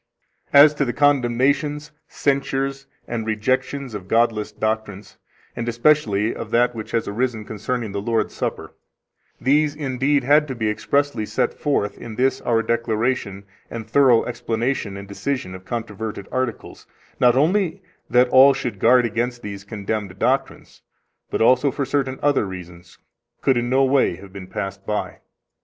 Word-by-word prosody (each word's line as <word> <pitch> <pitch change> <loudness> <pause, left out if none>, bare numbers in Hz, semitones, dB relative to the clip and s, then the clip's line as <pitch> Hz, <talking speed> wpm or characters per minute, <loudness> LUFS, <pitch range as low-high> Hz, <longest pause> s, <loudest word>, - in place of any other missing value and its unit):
20 140 +1 +9
As 150 - +2
to 150 - 0
the 120 -3 -2
condemnations, 145 +2 +1 0.2
censures, 135 -1 -1 0.2
and 115 -2 -4
rejections 130 +4 -1
of 100 -3 -7
godless 115 -1 +1
doctrines, 110 -2 -4 0.4
and 120 0 -3
especially 115 -4 +2
of - - -7
that 120 +1 +2
which 110 -2 -7
has 115 - -1
arisen 110 0 -2
concerning 110 +1 -4
the 100 0 -3
Lord's 115 +2 -1
Supper, - - -4 0.7
these 145 +2 +2
indeed 140 -1 0
had 150 +3 +4
to 130 - -5
be 110 -2 0
expressly 140 +1 0
set - - -1
forth 140 -9 -1
in 115 -2 -8
this 130 +3 +1
our 115 -1 +1
declaration 115 -3 -1 0.3
and 115 -1 -7
thorough 125 -1 +4
explanation 115 -3 -2
and 100 0 -9
decision 100 -1 -3
of 95 0 -10
controverted 110 -3 -5
articles, 130 -3 -4 0.3
not 125 -1 +5
only 185 +5 +1 0.3
that 125 +1 +4
all 135 +2 +7
should 120 -7 -4
guard 125 +3 +5
against 120 +2 -2
these 100 -1 -7
condemned 100 -2 -4
doctrines, - - -2 0.5
but - - 0
also 130 +4 +4
for 140 +1 -2
certain 135 -1 -1
other 140 -7 +2
reasons 90 -2 -10 0.4
could 135 - +3
in 120 0 -1
no 135 +2 +3
way 135 -8 +2
have 95 +1 -14
been 95 -2 -8
passed 95 +1 -5
by. 105 +1 -3
120 Hz, 155 wpm, -22 LUFS, 105-135 Hz, 0.7 s, 20